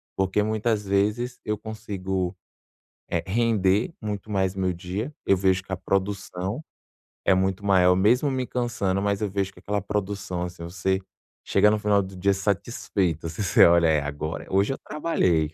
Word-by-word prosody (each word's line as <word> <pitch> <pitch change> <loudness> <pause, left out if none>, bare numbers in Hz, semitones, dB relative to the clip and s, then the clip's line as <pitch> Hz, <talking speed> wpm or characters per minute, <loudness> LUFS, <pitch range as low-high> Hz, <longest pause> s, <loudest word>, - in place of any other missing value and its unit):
porque 95 +2 +1
muitas 110 0 0
vezes 105 +5 0
eu 105 -1 -1
consigo, 95 -4 -3 0.8
eh, 85 -1 -1
render 105 - +2
muito 105 -1 -4
mais 95 -2 +1
meu 95 -1 0
dia, 95 - -4
eu 95 - +4
vejo 95 0 +2
que 95 - -13
a 95 - -1
produção 95 +3 -2 0.6
é - - +4
muito 95 +1 +1
maior 90 -2 +5
mesmo 120 +9 +3
me 130 -1 -1
cansando, 110 -7 -1
mas 100 0 0
eu 105 - 0
vejo 100 0 -1
que - - -16
aquela 105 0 -1
produção, 100 -3 -3
assim, 90 -1 -6
você 95 +2 -1 0.4
chega 105 - +4
no 105 - +2
final 105 -1 +3
do 95 0 -8
dia 100 +2 +2
satisfeita 95 - -1
assim, 80 - -7
você 90 - +6
olha: 85 0 +6
"É 75 -2 +3
agora, 75 +2 -4
hoje 100 +7 +2
eu - - -9
trabalhei". 90 - 0
95 Hz, 170 wpm, -25 LUFS, 95-105 Hz, 0.8 s, você